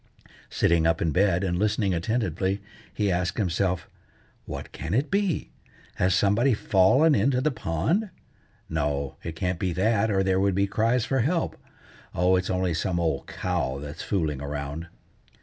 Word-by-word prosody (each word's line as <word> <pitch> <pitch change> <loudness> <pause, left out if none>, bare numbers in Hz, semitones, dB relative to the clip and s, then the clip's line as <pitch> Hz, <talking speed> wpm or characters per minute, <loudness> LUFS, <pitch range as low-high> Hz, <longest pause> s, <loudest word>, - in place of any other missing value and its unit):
Sitting 80 -1 +2
up 80 0 +2
in 80 - 0
bed, 95 +2 +2
and 90 -2 -1
listening 105 -2 +1
attentively, 95 0 -1 0.3
he 105 -2 0
asked 90 0 -1
himself:— 95 -2 0 0.6
"What - - -7
can 80 +5 -3
it 135 +5 0
be? 200 -4 0 0.5
Has 90 0 +2
somebody 110 +7 +3
fallen 120 +12 +4
into 135 -2 +2
the 150 +4 +1
pond? 135 - -1 0.6
No, 70 -3 -2
it 85 -1 -6
can't 90 +1 -2
be 95 -3 -1
that, 110 +4 +2
or 95 -2 +2
there 95 0 +2
would 100 -1 +2
be 100 +1 +3
cries 110 +4 +1
for 135 - 0
help. 160 +7 0 0.6
Oh! 90 +2 +3
it's 90 0 -1
only 90 -2 0
some 85 +2 -1
old 80 -2 -1
cow 65 +1 -2
that's 75 +3 -7
fooling 80 -8 -1
around." 70 +3 -5
95 Hz, 160 wpm, -26 LUFS, 85-110 Hz, 0.6 s, fallen